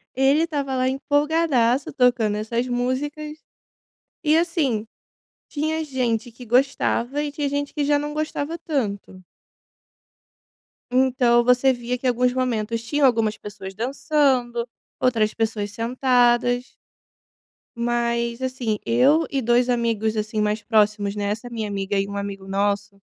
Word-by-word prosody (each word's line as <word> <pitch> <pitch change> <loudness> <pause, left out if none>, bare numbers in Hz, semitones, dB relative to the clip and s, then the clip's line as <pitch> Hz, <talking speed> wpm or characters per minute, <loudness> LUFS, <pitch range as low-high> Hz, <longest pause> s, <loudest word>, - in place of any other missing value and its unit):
Ele 275 +4 +3
estava 285 -5 -3
lá 255 0 +1
empolgadaço 285 -3 +1
tocando 245 -5 +2
essas 230 +3 -2
músicas. 290 +5 -2 0.9
E 305 +1 +4
assim 310 - 0 0.6
tinha 315 +2 -2
gente 245 -4 -2
que 245 +2 -12
gostava 260 +2 +1
e 295 - -3
tinha 290 0 -2
gente 285 0 -2
que 295 -2 -1
já 290 0 +3
não 295 +1 -3
gostava 310 +1 -3
tanto. 200 - -4 1.7
Então, 250 -2 +3
você 250 +2 +4
via 245 0 -3
que 260 - -2
alguns 250 0 +2
momentos 230 -3 -1
tinham 290 +3 +1
algumas 220 -4 +2
pessoas 195 -2 -9
dançando, 250 -1 0 0.3
outras 225 -4 +2
pessoas 215 -2 -2
sentadas. 245 +1 +1 1.0
Mas 235 0 -1
assim, 255 -5 -2
eu 270 +8 +4
e 275 - -1
2 240 +1 +2
amigos 225 -2 0
assim, 215 0 -1
mais 210 0 0
próximos, 210 -2 +2
né. 205 - -2
Essa 220 +4 -3
minha 225 -2 -4
amiga 200 0 -2
e 195 - -1
um 200 0 -5
amigo 200 -1 -5
nosso, 200 +1 -1
245 Hz, 130 wpm, -23 LUFS, 220-275 Hz, 1.7 s, E